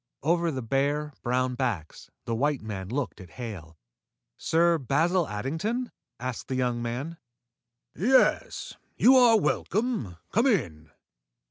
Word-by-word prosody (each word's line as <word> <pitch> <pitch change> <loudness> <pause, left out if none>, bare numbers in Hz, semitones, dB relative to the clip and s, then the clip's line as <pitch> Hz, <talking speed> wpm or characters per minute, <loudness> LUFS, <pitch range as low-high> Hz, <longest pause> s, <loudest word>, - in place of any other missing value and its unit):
Over 170 +2 +2
the 130 -5 -3
bare, 145 +5 0
brown 125 +1 0
backs, 115 -11 -3 0.2
the 115 - -2
white 140 +2 0
man 95 -3 -5
looked 125 - -3
at 90 - -12
Hale. 90 -10 -7 0.6
"Sir 170 0 +2
Basil 160 +6 +1
Addington?" 160 - -3 0.3
asked 125 -1 -5
the 130 - -2
young 125 -2 0
man. 130 +8 -4 0.8
"Yes. 255 +8 +2 0.2
You 260 +2 +6
are 240 -3 +7
welcome. 210 - -1
Come 230 +6 +3
in." 80 - 0
135 Hz, 125 wpm, -27 LUFS, 115-170 Hz, 0.8 s, are